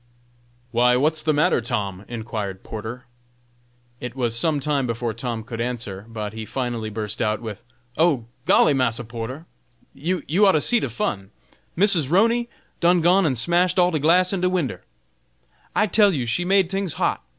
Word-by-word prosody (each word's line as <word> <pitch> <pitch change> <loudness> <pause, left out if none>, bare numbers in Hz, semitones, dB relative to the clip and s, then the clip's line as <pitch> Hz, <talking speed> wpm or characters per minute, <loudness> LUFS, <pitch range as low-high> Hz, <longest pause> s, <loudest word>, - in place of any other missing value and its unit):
"Why! 125 +1 +4
what's 155 +4 +3
the 155 - +1
matter, 150 -4 +2
Tom?" 105 -5 -3
inquired 110 -5 -5
Porter. 115 +3 -7 0.9
It 125 0 -6
was 120 -3 -1
some 150 +5 +1
time 140 -2 0
before 115 0 -2
Tom 115 -1 -4
could 115 0 -6
answer, 115 -5 -4
but 110 -2 -5
he 110 0 -6
finally 120 -2 -3
burst 105 0 -4
out 110 -1 0
with: 110 -2 -8 0.3
"Oh! 155 -8 +2 0.2
golly, 150 - +5
Massa 120 -3 0
Porter, 120 +7 -7 0.5
you 175 +5 -2 0.2
ought 195 -2 +6
to 155 - +3
see 240 +8 +4
de 140 - -3
fun. 100 -4 -3 0.5
Missus 180 -6 +3
'Roney 230 - +2 0.3
done 175 0 +4
gone 180 +2 +4
and 130 -4 0
smashed 175 - +2
all 180 0 +4
de 155 - 0
glass 180 +5 +3
in 190 - -1
de 180 - +2
winder. 180 -7 -2 0.9
I 210 - +4
tell 205 +1 +4
you 135 -8 -2
she 145 +10 -1
made 190 0 +3
tings 195 -2 -2
hot. - - -1
130 Hz, 175 wpm, -23 LUFS, 115-175 Hz, 0.9 s, ought